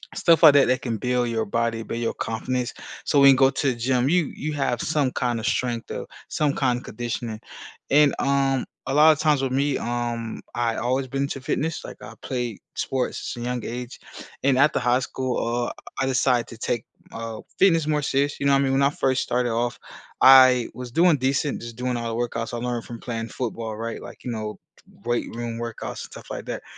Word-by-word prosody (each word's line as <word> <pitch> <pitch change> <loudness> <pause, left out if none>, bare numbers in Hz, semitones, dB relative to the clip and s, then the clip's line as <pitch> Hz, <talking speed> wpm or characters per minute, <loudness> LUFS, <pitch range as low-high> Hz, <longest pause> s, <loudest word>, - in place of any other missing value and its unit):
stuff 170 -1 +4
like 150 -3 +10
that 140 -1 +5
that 130 0 +1
can 115 -3 -1
build 125 +1 0
your 110 -1 0
body, 115 +1 -1
build 115 - -4
your 115 - -1
confidence. 125 +2 -3 0.3
So 145 - +3
when 140 0 +9
you - - +5
go 135 0 +6
to 140 - -1
the - - -9
gym, 125 +2 +1
you 175 -3 +2
you 155 +1 -4
have 130 -4 -1
some 145 -4 +1
kinda 120 -3 -1
strength 120 -1 -1
or - - -5 0.2
some 150 -2 0
kinda 125 -2 +1
conditioning. 115 -1 -5 0.5
And, 145 0 +5
um, 135 -1 +1 0.2
a 135 - -1
lot 155 +2 +7
of 150 - 0
times 150 -3 +3
with 130 - -1
me, 140 +1 +1
um, 120 -1 -3
I 120 -1 0
always 130 +3 0
been 135 +2 -2
into 140 -1 -3
fitness. 155 +4 -2
Like, - - -9
I 110 +2 -10
played 120 -5 -3 0.2
sports 130 -2 -2
since 120 0 -6
a - - -2
young 125 -2 -3
age, 125 +1 -6 0.4
and 135 -2 +3
after 140 +2 +4
high 125 +1 +2
school, 130 -1 -2 0.2
uh, - - -4 0.3
I - - +2
decided 125 -2 +2
to 115 - -11
take, 115 0 -2 0.3
uh, 115 -1 -6 0.2
fitness 165 -5 +4
more 150 -1 +1
serious, 140 +1 0
you 140 - -2
know 140 - +5
what 135 - +5
I - - +2
mean? 135 - +1
When 135 - +2
I 140 - +5
first 135 -2 0
started 125 -1 0
off, 120 +1 -1 0.4
I 130 -2 +8
was 125 -1 -8
doing 165 +2 +4
decent, 135 +1 0
just 115 -1 -8
doing 125 +1 -2
all 115 -1 -3
the - - -2
workouts 115 -1 -3
I 120 - -2
learned 120 -1 -3
from 115 -2 -8
playing 115 -1 -4
football, 115 -3 -4
right? 115 0 -5
Like, - - -11
you 125 - -4
know, 110 -2 -4 0.5
weight 120 0 -1
room 115 -1 -4
workouts 115 -1 -5
and - - -16
stuff - - -11
like - - -5
that. - - -5
125 Hz, 220 wpm, -24 LUFS, 120-140 Hz, 0.5 s, like